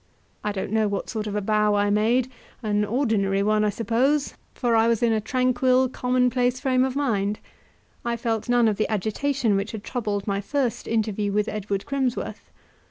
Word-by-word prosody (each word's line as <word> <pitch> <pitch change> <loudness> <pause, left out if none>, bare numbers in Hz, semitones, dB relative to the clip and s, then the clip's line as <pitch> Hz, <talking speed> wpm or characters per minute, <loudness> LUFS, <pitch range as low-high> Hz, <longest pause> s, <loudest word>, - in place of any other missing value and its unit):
I 210 - -1
don't 195 -1 -4
know 220 -1 +2
what 200 -1 -3
sort 215 -1 -3
of 205 - -4
a 210 - 0
bow 210 0 +2
I 205 0 +2
made; 235 +5 +2 0.3
an 210 -1 +1
ordinary 210 -4 +1
one, 215 +1 +2
I 210 - +2
suppose, 245 +8 +1 0.2
for 240 -2 +1
I 225 0 +4
was 230 0 +1
in 230 -1 +3
a 215 - 0
tranquil, 255 +2 +2
commonplace 250 0 +1
frame 255 -1 +2
of 260 0 -1
mind; 210 -7 0 0.7
I 235 0 -1
felt 225 -1 -2
none 240 -1 +4
of 210 -2 +1
the 215 - 0
agitation 220 +3 0
which 200 +3 -2
had 215 -2 -6
troubled 210 -6 -3
my 200 -1 -1
first 255 +2 -2
interview 215 -2 0
with 210 +1 +1
Edward 200 -2 -3
Crimsworth. 265 -3 -3
225 Hz, 185 wpm, -24 LUFS, 210-250 Hz, 0.7 s, I